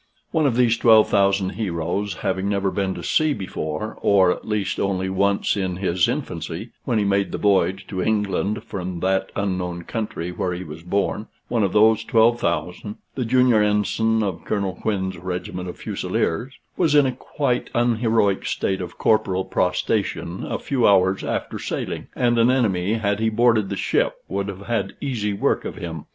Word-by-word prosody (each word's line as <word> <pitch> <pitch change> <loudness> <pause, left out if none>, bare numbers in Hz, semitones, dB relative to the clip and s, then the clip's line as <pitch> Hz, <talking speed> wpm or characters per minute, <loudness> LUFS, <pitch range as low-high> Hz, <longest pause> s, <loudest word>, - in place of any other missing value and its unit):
One 155 -2 +2
of 125 - 0
these 120 -2 +3
12,000 100 -4 +4
heroes 95 0 -2
having 95 +1 0
never 100 -1 0
been 95 -1 -1
to 85 - -7
sea 155 - +2
before, 85 +1 -5
or, 95 -3 +4
at - - -5
least, 105 -2 -1
only 95 -1 0
once 100 +1 +1
in 95 -3 -2
his 90 -2 +1
infancy, 85 +7 -4
when 120 -4 +1
he 105 - +2
made 100 0 +1
the - - -3
voyage 95 -2 +2
to 95 -2 -3
England 105 0 0
from 90 -5 -5
that 95 +1 0
unknown 90 -3 -2
country 105 -5 -4
where 90 0 -2
he 90 - -5
was 80 -1 -9
born 100 +4 -1 0.2
one 120 -2 +1
of 95 - +1
those 110 +1 +4
12,000 105 -4 +1 0.2
the 130 - -2
junior 125 -2 +4
ensign 110 +2 +1
of 95 -5 -3
Colonel 100 -3 -1
Quin's 95 -2 -2
regiment 90 0 -4
of - - -8
Fusileers 120 +12 -2 0.2
was 160 -5 +2
in 145 -2 +6
a 130 - +1
quite 125 0 -2
unheroic 115 -4 +2
state 95 -1 -1
of 90 -1 -7
corporal 95 -4 +2
prostration 90 -1 -1
a - - -2
few 130 -4 +1
hours 95 -1 +3
after - - -3
sailing; - - -4
and 120 -1 +2
an 115 +2 +5
enemy, 105 -6 +1
had 100 -2 0
he 110 0 +2
boarded 110 -2 +3
the - - -3
ship, - - +1
would 100 +1 -2
have 100 -1 -6
had 120 -1 -1
easy 115 -7 -2
work 100 - 0
of - - -5
him. 80 -3 -7
100 Hz, 175 wpm, -22 LUFS, 95-110 Hz, 0.2 s, in